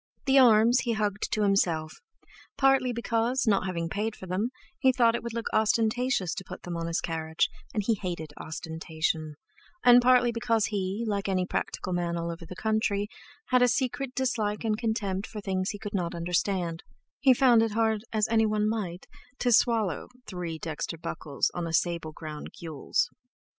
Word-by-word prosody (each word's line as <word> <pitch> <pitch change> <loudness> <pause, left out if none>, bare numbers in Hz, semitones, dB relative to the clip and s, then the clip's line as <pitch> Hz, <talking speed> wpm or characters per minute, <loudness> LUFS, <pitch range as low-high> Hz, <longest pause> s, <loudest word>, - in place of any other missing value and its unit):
The 270 0 +5
arms 235 0 +6
he 240 -2 0
hugged 210 -1 -1
to 215 - +1
himself, 170 -6 +1 0.6
partly 270 -2 +4
because, 235 +2 0
not 200 -4 +2
having 170 -2 -2
paid 210 +5 -2
for - - -10
them, 190 +6 -1 0.3
he 265 -2 +5
thought 240 -3 +3
it 235 - -2
would 235 -1 -6
look 230 - -3
ostentatious 220 -2 +1
to 190 - -6
put - - -10
them 175 -1 -5
on 165 0 -3
his 165 0 -1
carriage, 160 -1 0 0.2
and 210 -4 -1
he 230 - +3
hated 175 -7 -5
ostentation, 160 -1 -3 0.5
and 245 0 +8
partly 245 -1 +5
because 230 -2 +1
he, 200 +2 -2
like 200 -2 -1
any 185 -1 +1
practical 185 0 -3
man 170 -1 -1
all 170 0 -2
over 170 0 -9
the 180 - -8
country, 210 0 0 0.4
had 250 -1 +4
a 250 - +6
secret 260 +1 -1
dislike 220 -5 -1
and 215 -1 0
contempt 210 -4 -1
for 215 - -7
things 190 -2 -1
he 205 - -4
could 205 0 -7
not 175 -3 -1
understand 175 0 -1 0.4
he 270 - +5
found 245 -2 +5
it 225 -2 0
hard, 220 -1 +1
as 215 -1 +1
anyone 215 -2 +2
might, 195 -5 -3 0.3
to 245 - +1
swallow 220 - +2 0.2
"three 175 -4 -5
dexter 160 +1 -4
buckles 150 -3 -2
on 175 -1 -3
a 165 - -5
sable 170 -2 0
ground 155 -1 -7
gules." 165 - -1
205 Hz, 180 wpm, -28 LUFS, 170-230 Hz, 0.6 s, and